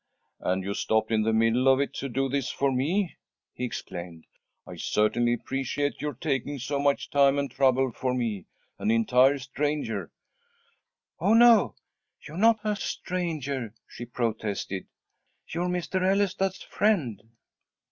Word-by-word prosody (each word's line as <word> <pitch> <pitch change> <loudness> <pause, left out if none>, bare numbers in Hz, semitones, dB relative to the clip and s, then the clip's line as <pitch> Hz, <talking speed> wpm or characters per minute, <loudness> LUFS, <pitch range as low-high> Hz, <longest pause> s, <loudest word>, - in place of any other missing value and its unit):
"And 95 +1 -1
you 100 +1 -2
stopped 110 +2 0
in 110 -1 +3
the 110 +1 +1
middle 115 +3 +3
of 135 0 +5
it 140 - -1
to 140 - -4
do 135 +2 0
this 135 -1 -1
for 140 -1 0
me!" 165 +9 0 0.4
he 125 - -3
exclaimed. 85 -7 -7 0.4
"I - - -9
certainly 120 +3 +1
appreciate 135 +3 -2
your 150 -3 -3
taking 140 0 -2
so 140 +2 -2
much 140 0 0
time 140 -1 +4
and 140 -2 -1
trouble 130 -1 +2
for 125 +2 -2
me 115 -6 -2 0.3
an - - -1
entire 125 +5 +4
stranger." 145 +3 -2 1.1
"Oh, 215 - +3
no! 230 - +6 0.5
You're 155 +2 -9
not 220 +2 +4
a 210 -1 0
stranger," 145 - -3
she 120 - -8
protested. 110 -5 -3 0.6
"You're 175 +2 -2
Mr. 180 +1 -1
Ellestad's 195 0 +1
friend." 155 - 0
135 Hz, 140 wpm, -27 LUFS, 115-160 Hz, 1.1 s, no